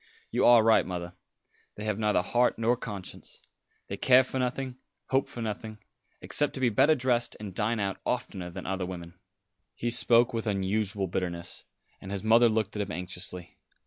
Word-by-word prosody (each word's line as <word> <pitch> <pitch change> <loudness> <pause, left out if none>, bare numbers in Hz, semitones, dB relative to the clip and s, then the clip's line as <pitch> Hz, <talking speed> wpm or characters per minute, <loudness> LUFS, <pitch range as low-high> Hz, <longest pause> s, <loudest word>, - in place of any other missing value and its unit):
You - - +3
are 120 -2 +7
right, 115 0 +5
mother. 90 -1 -5 0.6
They 105 - -7
have 105 -1 -1
neither 105 -4 +2
heart 120 +6 +2
nor 115 +2 +2
conscience. 105 -6 -8 0.5
They - - -5
care 130 0 +6
for 130 +1 -4
nothing, 130 0 -2 0.3
hope 135 +1 +1
for 120 - -6
nothing, 110 0 -5 0.4
except 145 - 0
to - - -5
be 130 -2 +3
better 135 +8 +4
dressed 125 -3 0
and 105 -3 -7
dine 110 +3 0
out 100 -1 -2
oftener 90 -2 -3
than 95 +2 -8
other 95 -1 -2
women." 85 -1 -8 0.6
He 120 - -2
spoke 120 0 +4
with 115 0 -2
unusual 100 0 0
bitterness, 85 -1 -4 0.4
and 95 - -8
his 100 -2 -3
mother 115 +2 +6
looked 110 -2 -1
at 105 - -1
him 100 0 -4
anxiously. 90 -1 -5
105 Hz, 175 wpm, -28 LUFS, 95-120 Hz, 0.6 s, are